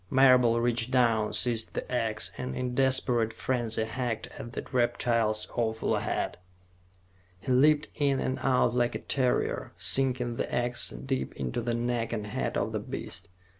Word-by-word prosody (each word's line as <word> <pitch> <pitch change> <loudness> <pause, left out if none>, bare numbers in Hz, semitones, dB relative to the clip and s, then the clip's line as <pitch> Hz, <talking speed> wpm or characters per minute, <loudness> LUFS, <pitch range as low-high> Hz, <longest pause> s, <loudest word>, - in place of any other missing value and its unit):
Marable 125 -3 +5
reached 120 0 +1
down, 115 -4 +2
seized 115 -2 0
the - - -4
ax, 110 -3 -1
and 125 0 -5
in 125 - -2
a - - -1
desperate 125 -3 +2
frenzy 115 -1 -1
hacked 115 -1 -3
at 120 - -8
the - - -5
reptile's 115 -3 +1
awful 110 -2 0
head. - - -2 1.0
He 130 - -4
leaped 150 +4 +4
in 140 -2 +1
and 130 - -2
out 125 -3 +2
like 120 -1 +1
a - - -2
terrier, 130 -3 -1
sinking 125 -3 +1
the - - -2
ax 120 0 +1
deep 135 -1 -4
into 120 - -3
the 120 0 -1
neck 120 -1 -1
and 105 -3 -3
head 105 - -2
of - - -1
the - - -2
beast. - - -7
120 Hz, 165 wpm, -28 LUFS, 115-130 Hz, 1.0 s, Marable